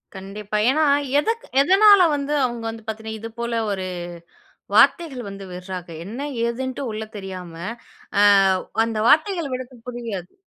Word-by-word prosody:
கண்டிப்பா. 200 +2 -5
ஏன்னா 310 +3 +3 0.4
எதுக் 455 +8 -1 0.2
எதன்னால 390 +3 +7
வந்து 285 +1 -2
அவங்க 240 -2 -4
வந்து 225 -1 -8
பாத்தீங்கன்னா 220 0 -5
இது 225 - -7
போல 235 0 -2 0.2
ஒரு 190 -1 -3 0.9
வார்த்தைகள் 275 - +4
வந்து 195 0 -8
விடுறாக. 180 0 -7 0.2
என்ன 225 +8 -7 0.3
எதுன்னு 260 +3 -4
உள்ள 215 +1 -4
தெரியாம 185 -4 -7 0.7
ஆ - - +6 0.6
அந்த 225 -1 -3
வார்த்தைகள் 325 -1 +3
விடறது 255 0 -7
புரியாது. 230 -7 -6
230 Hz, 130 wpm, -22 LUFS, 200-280 Hz, 0.9 s, எதன்னால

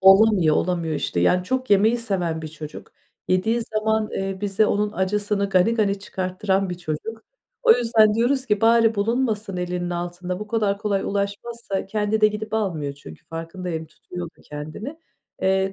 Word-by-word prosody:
Olamıyor, 190 -4 +6
olamıyor, 170 -3 0
işte, 90 -11 -1
yani, 180 - +3
çok 255 +3 -2
yemeyi 215 +4 +5
seven 180 -8 -2
bir 155 - -5
çocuk, 155 -1 -9 0.4
yediği 220 +6 +2
zaman, 220 0 0
eee, 195 0 -3
bize 205 +1 +2
onun 210 +1 0
acısını 200 +1 0
gani 190 +5 +3
gani 200 -3 +1
çıkarttıran 190 0 -1
bir 180 - -5
çocuk. 180 +8 -5 0.4
O 470 - +8
yüzden 225 - +4
diyoruz 260 +4 +1
ki 210 -2 +1
"Bari 230 0 +5
bulunmasın 215 -2 0
elinin 180 0 -2
altında 175 +2 -4
bu 210 - -5
kadar 210 -3 0
kolay 200 -2 0
ulaşmazsa." 200 +1 -3
Kendi 210 +1 0
de 215 - +7
gidip 215 +1 -5
almıyor 165 -10 -1
çünkü 80 - -13
farkındayım, 165 0 -5
tutuyor 175 +3 -8
da - - -20
kendini. 155 - -7 0.4
Eee, 190 0 +2
200 Hz, 160 wpm, -23 LUFS, 180-220 Hz, 0.4 s, O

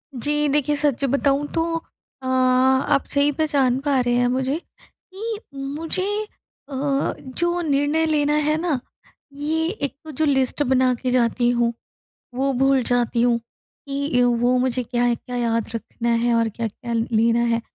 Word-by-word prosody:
जी, 295 +4 +1
देखिए 295 +1 +1
सच 285 -3 0
बताऊँ 280 +2 +1
तो 325 - +1 0.6
अ, - - -10
आप 260 +1 +3
सही 285 +1 +3
पहचान 275 -4 +1
पा 280 -2 +1
रहे 245 -1 0
हैं 245 0 +3
मुझे 260 +3 0
कि 415 +5 -9 0.4
मुझे 330 +3 -1 0.7
अ, 275 0 -1
जो 345 +6 -2
निर्णय 295 +1 +1
लेना 295 -2 +2
है 305 - +2
ना? 310 -7 0 0.5
ये 315 +3 -1
एक 290 -9 -3
तो 310 - -7
जो 310 +3 0
लिस्ट 270 0 +1
बना 255 -1 +3
के 255 -1 -1
जाती 240 0 +2
हूँ, 235 -1 +1 0.6
वो 270 +2 0
भूल 270 +1 +3
जाती 240 -1 +1
हूँ। 240 -1 +3 0.5
कि 280 -2 0
अ, 245 - +5
वो 245 +1 +2
मुझे 250 0 0
क्या-क्या 245 0 -1
याद 230 -2 0
रखना 235 +1 -4 0.2
है 240 - +2
और 230 -1 +2
क्या-क्या 230 +2 -5
लेना 230 0 +2
है? 230 - 0
265 Hz, 155 wpm, -22 LUFS, 245-290 Hz, 0.7 s, अ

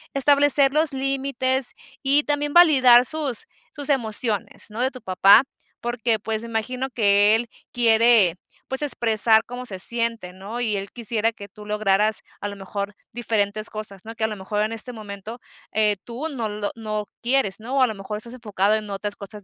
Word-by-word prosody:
Establecer 280 0 +4
los 310 0 +4
límites 265 -1 -1 0.3
y 285 +1 +3
también 290 0 -1
validar 260 -8 +7
sus 285 -5 -2 0.3
sus 290 0 -5
emociones, 220 -5 -2
¿no?, 225 +3 -4
de 260 - +2
tu 255 - -11
papá, 195 +5 +5 0.4
porque, 240 -1 -1
pues, 220 +1 -3
me - - -7
imagino 250 +4 -3
que 205 -3 +4
él 230 +1 -3 0.2
quiere, 225 -6 +4 0.3
pues, 265 +2 -1
expresar 225 -4 +3
cómo 245 +1 -7
se 190 -6 -7
siente, 230 -3 -1
¿no? 200 +6 -7
Y 215 -4 0
él 195 0 -6
quisiera 230 -1 -1
que 200 -2 -11
tú 210 +2 -13
lograras, 210 0 +1 0.2
a - - -4
lo 200 - -7
mejor, 200 +1 -6 0.2
diferentes 215 -2 -1
cosas, 215 -3 -8
¿no? 225 +1 -8
Que, 225 - -4
a - - +3
lo 215 -2 -6
mejor, 210 +2 -3
en 215 - -2
este 225 +2 -2
momento, 215 +2 -9 0.3
eh, 210 -1 +2
tú 250 +7 -5
no 245 -7 -3
lo 210 -1 -4
no 215 -2 -4 0.2
quieres, 240 -6 +1
¿no? 240 +5 -5
O 270 - +3
a 255 - +5
lo 220 - -5
mejor, 195 +2 -6
estás 235 +2 -7
enfocado 210 -4 0
en 215 -1 -4
otras 205 +1 -5
cosas 205 0 -10
225 Hz, 190 wpm, -23 LUFS, 210-255 Hz, 0.4 s, validar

